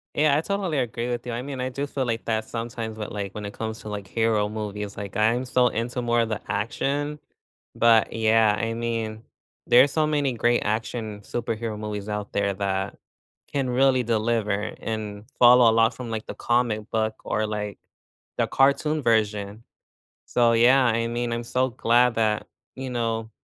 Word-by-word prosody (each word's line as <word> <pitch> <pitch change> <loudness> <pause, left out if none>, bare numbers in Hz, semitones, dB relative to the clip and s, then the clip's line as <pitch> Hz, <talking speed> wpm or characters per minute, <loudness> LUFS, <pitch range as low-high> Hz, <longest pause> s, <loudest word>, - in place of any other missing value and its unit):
Yeah, 150 -1 +4
I - - +1
totally 190 -5 -1
agree 120 -1 -2
with 120 0 -3
you, 120 - -3
I 120 +2 -3
mean, 135 -2 -5
I 130 - -1
do 140 +3 -3
feel 140 -1 -3
like 115 -1 -2
that 110 -1 0
sometimes 115 -1 -5
with, 105 - -5
like, 100 -1 -4
when 105 -1 -5
it 100 - -6
comes 110 -1 -5
to, 110 - -8
like, 100 -2 -5
hero 110 -1 +1
movies, 105 -1 -5
like, 100 -2 -6
I'm 115 +4 +2
so 125 0 +3
into 120 +2 -2
more 120 0 +2
of 115 - -1
the 110 -1 -3
action, 145 +7 -2 0.6
but 115 -1 +4
yeah, 110 -1 +3
I 115 0 -1
mean, 115 -1 -3 0.4
there 120 - +8
are - - +3
so 155 +2 +1
many 145 -4 +1
great 120 +1 +2
action 110 -1 -3
superhero 115 -1 -3
movies 105 -1 -5
out 105 -1 -4
there 100 -1 0
that 95 0 -2 0.6
can 135 -3 0
really 130 +1 +3
deliver 110 -2 0
and 105 -2 -5
follow 120 -1 +8
a - - +4
lot 115 +1 +4
from, 125 -2 -7
like, 110 -1 -4
the - - -6
comic 120 -3 0
book 110 -1 0
or, 110 0 -1
like, 105 -2 -4 0.6
the - - +1
cartoon 150 +3 +2
version, 105 -2 0 0.6
so 120 -1 +3
yeah, 125 +3 +5
I 115 0 +1
mean, 120 0 -2
I'm 120 0 -2
so 130 +2 0
glad 120 0 +3
that, 110 -1 +1 0.3
you 130 0 -5
know, 115 -2 -2
115 Hz, 185 wpm, -25 LUFS, 105-125 Hz, 0.6 s, there